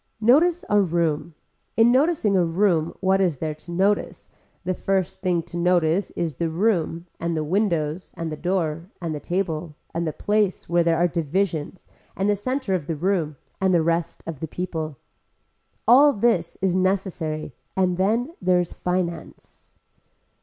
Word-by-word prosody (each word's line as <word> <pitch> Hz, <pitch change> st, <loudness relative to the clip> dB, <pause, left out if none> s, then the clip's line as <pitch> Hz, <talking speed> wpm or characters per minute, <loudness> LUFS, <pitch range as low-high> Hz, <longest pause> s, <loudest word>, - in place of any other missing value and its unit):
Notice 315 Hz, +10 st, +4 dB
a 210 Hz, 0 st, +4 dB
room, 165 Hz, -3 st, 0 dB, 0.4 s
in 225 Hz, +1 st, +6 dB
noticing 265 Hz, -, +3 dB
a 180 Hz, -, +4 dB
room 170 Hz, -1 st, +1 dB
what 190 Hz, 0 st, +3 dB
is 175 Hz, -7 st, +1 dB
there 155 Hz, +2 st, -2 dB
to 155 Hz, +3 st, -12 dB
notice, 195 Hz, +4 st, 0 dB, 0.3 s
the 185 Hz, +1 st, 0 dB
first 190 Hz, 0 st, -1 dB
thing 180 Hz, -3 st, +1 dB
to 175 Hz, +1 st, -7 dB
notice 175 Hz, +1 st, +2 dB
is 160 Hz, -6 st, -2 dB
the 170 Hz, -, 0 dB
room 170 Hz, -2 st, 0 dB
and 170 Hz, -1 st, -1 dB
the 155 Hz, -, 0 dB
windows 170 Hz, -2 st, -1 dB
and 165 Hz, -2 st, -4 dB
the -, -, -3 dB
door 170 Hz, -1 st, -2 dB
and 165 Hz, -3 st, -3 dB
the 150 Hz, -, -4 dB
table 170 Hz, -3 st, -2 dB, 0.2 s
and 170 Hz, +1 st, -1 dB
the -, -, 0 dB
place 205 Hz, +3 st, 0 dB
where 170 Hz, 0 st, +3 dB
there 165 Hz, -1 st, +2 dB
are 175 Hz, +2 st, +3 dB
divisions 170 Hz, 0 st, -2 dB, 0.3 s
and 195 Hz, -, +1 dB
the 205 Hz, -, +3 dB
center 255 Hz, +1 st, -2 dB
of 170 Hz, -6 st, -1 dB
the 165 Hz, -, -1 dB
room 165 Hz, -2 st, 0 dB, 0.3 s
and 190 Hz, -1 st, +3 dB
the 165 Hz, -, +3 dB
rest 170 Hz, 0 st, -1 dB
of 160 Hz, -4 st, -6 dB
the 160 Hz, -, -4 dB
people. 160 Hz, -4 st, -4 dB, 0.9 s
All 280 Hz, +5 st, +7 dB
this 200 Hz, -6 st, +1 dB
is 190 Hz, -2 st, +2 dB
necessary 185 Hz, -5 st, -1 dB, 0.2 s
and 180 Hz, -2 st, +2 dB
then 230 Hz, -, +1 dB
there 180 Hz, -1 st, +3 dB
is 175 Hz, -, -2 dB
finance. 180 Hz, -2 st, -4 dB
175 Hz, 165 wpm, -24 LUFS, 165-195 Hz, 0.9 s, All